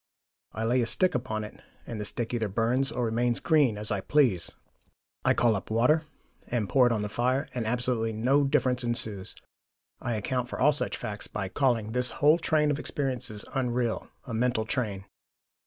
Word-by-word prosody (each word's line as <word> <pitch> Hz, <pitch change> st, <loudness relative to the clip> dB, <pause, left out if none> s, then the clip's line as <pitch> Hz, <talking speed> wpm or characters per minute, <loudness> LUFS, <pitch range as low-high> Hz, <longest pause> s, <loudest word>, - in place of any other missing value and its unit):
I 110 Hz, -, -3 dB
lay 125 Hz, +3 st, +2 dB
a 115 Hz, -, 0 dB
stick 185 Hz, +7 st, +2 dB
upon 115 Hz, -4 st, -2 dB
it 105 Hz, -, -10 dB, 0.2 s
and 110 Hz, -3 st, -5 dB
the -, -, -3 dB
stick 115 Hz, +3 st, -3 dB
either 115 Hz, -2 st, 0 dB
burns 120 Hz, +5 st, +1 dB
or 120 Hz, +1 st, -1 dB
remains 120 Hz, +1 st, +1 dB
green, 145 Hz, -9 st, +3 dB
as 105 Hz, +1 st, -1 dB
I 100 Hz, -2 st, 0 dB
please. 125 Hz, -, +2 dB, 0.7 s
I -, -, +3 dB
call 115 Hz, -2 st, +3 dB
up 95 Hz, -, -5 dB
water, 125 Hz, +8 st, +3 dB, 0.4 s
and 115 Hz, -4 st, -1 dB
pour 125 Hz, +4 st, +4 dB
it -, -, +1 dB
on 110 Hz, -3 st, 0 dB
the -, -, -2 dB
fire, 125 Hz, +5 st, 0 dB
and 120 Hz, -3 st, -2 dB
absolutely 120 Hz, -1 st, 0 dB
no 125 Hz, +6 st, +2 dB
difference 130 Hz, -2 st, +1 dB
ensues. 110 Hz, -5 st, 0 dB, 0.6 s
I 120 Hz, -2 st, -2 dB
account 125 Hz, +4 st, -2 dB
for -, -, -6 dB
all 145 Hz, +3 st, +5 dB
such 145 Hz, -, -1 dB
facts 105 Hz, -1 st, -6 dB
by 100 Hz, -3 st, -4 dB
calling 115 Hz, -2 st, +1 dB
this 125 Hz, +1 st, +1 dB
whole 150 Hz, +4 st, +5 dB
train 155 Hz, -2 st, +2 dB
of 145 Hz, -, -2 dB
experiences 125 Hz, -8 st, -3 dB
unreal, 125 Hz, -3 st, -1 dB, 0.2 s
a 115 Hz, -, -6 dB
mental 115 Hz, -1 st, +1 dB
train. 105 Hz, -5 st, -2 dB
120 Hz, 190 wpm, -28 LUFS, 110-130 Hz, 0.7 s, all